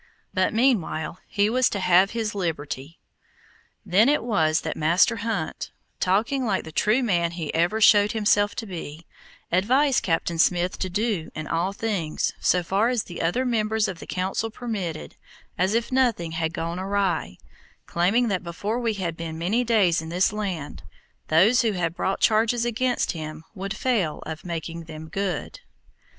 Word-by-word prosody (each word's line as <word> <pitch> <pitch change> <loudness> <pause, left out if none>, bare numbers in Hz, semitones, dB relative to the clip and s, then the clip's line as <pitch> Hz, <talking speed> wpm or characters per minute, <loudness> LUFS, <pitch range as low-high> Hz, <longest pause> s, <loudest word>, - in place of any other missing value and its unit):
But 185 -1 +2
meanwhile 215 -9 0
he 205 0 +1
was 250 +3 +3
to 200 - -3
have 185 +1 +4
his 225 -2 -2
liberty. 160 -5 -4 0.9
Then 215 +8 +4
it 295 -5 +2
was 160 -9 +2
that - - -4
Master 175 +9 +3
Hunt, 215 -7 -3 0.3
talking 225 +9 +1
like 205 -5 0
the 160 - -9
true 215 +10 +2
man 170 -6 +1
he 165 -3 -4
ever 175 +7 +1
showed 210 -1 +6
himself 205 -2 +2
to 225 - -4
be, 165 -4 -8 0.5
advised 255 - +3
Captain 165 -1 -1
Smith 175 +1 +2
to 185 - -2
do 200 -4 -1
in 155 - -4
all 170 +4 -1
things, 200 -7 -2
so 180 -1 +2
far 200 +7 +1
as 245 -3 0
the 175 - -7
other 175 +11 0
members 220 -2 +1
of 185 -4 -6
the - - -10
Council 190 +4 -2
permitted, 210 -9 -5 0.4
as 190 +5 +1
if 235 +2 -1
nothing 240 -11 +1
had 160 0 -1
gone 170 +1 -4
awry, 190 - -1 0.5
claiming 200 +8 +2
that 195 -4 -1
before 200 +7 -3
we 230 -3 -1
had 175 -4 -3
been 165 -1 -6
many 200 +9 +1
days 205 -9 +3
in 160 - -7
this 180 +4 +1
land, 190 -8 -4 0.5
those 195 +10 +5
who 225 -3 +1
had 170 -3 -1
brought 190 +2 -1
charges 225 +2 +2
against 245 +1 0
him 155 -1 -7
would 195 +1 -5
fail 210 -12 0
of 160 0 -6
making 170 -1 -5
them 160 0 -9
good. 195 -1 -3
190 Hz, 165 wpm, -24 LUFS, 165-220 Hz, 0.9 s, showed